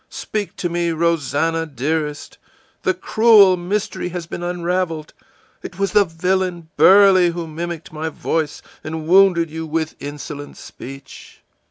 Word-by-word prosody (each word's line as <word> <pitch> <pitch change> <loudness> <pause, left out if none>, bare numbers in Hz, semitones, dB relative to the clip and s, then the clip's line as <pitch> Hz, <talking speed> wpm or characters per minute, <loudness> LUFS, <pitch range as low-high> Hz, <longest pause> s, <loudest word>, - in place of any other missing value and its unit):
Speak 210 -2 -5
to 175 - -2
me, 170 0 -1
Rosannah, 165 0 0
dearest! 150 +2 -3 0.4
The 375 - 0
cruel 220 - +5
mystery 180 +1 -3
has 175 -1 -5
been 170 - -7
unraveled; 175 -2 -2 0.5
it 175 - -9
was 195 0 0
the 210 -1 +4
villain 180 0 -2
Burley 190 +2 +6
who 170 0 -4
mimicked 165 0 -6
my 160 +1 -3
voice 155 -1 -3 0.2
and 155 0 -5
wounded 175 -2 +4
you 160 0 -5
with 160 0 -2
insolent 145 0 -8
speech! 135 +1 -12
170 Hz, 135 wpm, -20 LUFS, 155-185 Hz, 0.5 s, Burley